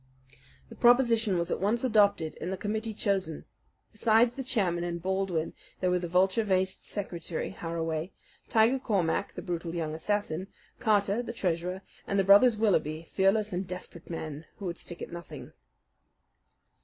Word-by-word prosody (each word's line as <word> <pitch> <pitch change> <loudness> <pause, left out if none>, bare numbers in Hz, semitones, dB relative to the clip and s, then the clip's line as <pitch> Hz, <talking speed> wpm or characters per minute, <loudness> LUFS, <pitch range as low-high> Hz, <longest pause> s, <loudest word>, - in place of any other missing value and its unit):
The - - -11
proposition 235 -5 +4
was 170 0 -1
at - - -1
once 215 +5 +1
adopted, 205 -9 +3
and 180 - -3
the 190 - -2
committee 220 +2 -3
chosen. 190 -8 -1 0.5
Besides 225 +2 +3
the 270 - -5
chairman 190 -9 0
and 170 0 -3
Baldwin 185 -2 -1 0.3
there 180 -1 +1
were 180 - +2
the 175 - -4
vulture 190 +5 +3
faced 190 -2 0
secretary, 175 -5 -4
Harraway, 165 -1 -3 0.4
Tiger 230 +4 +4
Cormac, 200 -6 0
the - - -7
brutal 170 -2 -4
young 160 -2 -2
assassin, 190 +1 -2 0.3
Carter, 210 -1 +2
the 235 -1 -6
treasurer, 180 -2 -2 0.2
and 200 - 0
the 195 - +4
brothers 205 +4 +6
Willaby, 165 -7 +1
fearless 200 +2 +2
and 180 +1 -2
desperate 180 -2 -7
men 155 -2 -5
who 200 - -7
would 170 -2 -3
stick 175 - -7
at - - -8
nothing. 170 0 -9
190 Hz, 155 wpm, -29 LUFS, 170-215 Hz, 0.5 s, brothers